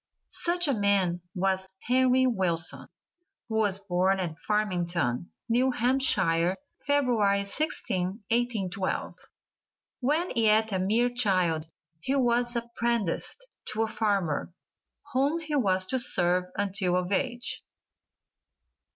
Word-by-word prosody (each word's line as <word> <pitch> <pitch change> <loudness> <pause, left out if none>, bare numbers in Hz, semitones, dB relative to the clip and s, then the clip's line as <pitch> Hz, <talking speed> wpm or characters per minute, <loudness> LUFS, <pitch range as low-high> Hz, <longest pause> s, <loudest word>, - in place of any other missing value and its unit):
Such 350 -1 0
a 280 - +2
man 200 -5 +1
was 190 0 0 0.2
Henry 255 +1 +3
Wilson, 180 -9 +1 0.6
who 220 -1 -2
was 205 -3 +2
born 190 0 0
at 165 -3 -4
Farmington, 175 - -1 0.2
New 245 +3 +2
Hampshire, 195 -9 +2 0.3
February 235 -9 +2
16th, 200 - -1
1812. 210 -6 -1 0.8
When 305 +7 0
yet 220 -1 +3
a 190 - 0
mere 220 +6 +2
child 185 -9 +1 0.3
he 265 +12 -1
was 240 -2 +1
apprenticed 235 - -1 0.3
to 220 +1 0
a - - -1
farmer, 200 -9 -1 0.6
whom 280 +5 +2
he 315 -2 -6
was 190 -8 +2
to 260 +7 -1
serve 180 -6 +2
until 195 -2 0
of 180 +1 -2
age. 245 +3 -1
210 Hz, 110 wpm, -27 LUFS, 185-245 Hz, 0.8 s, Henry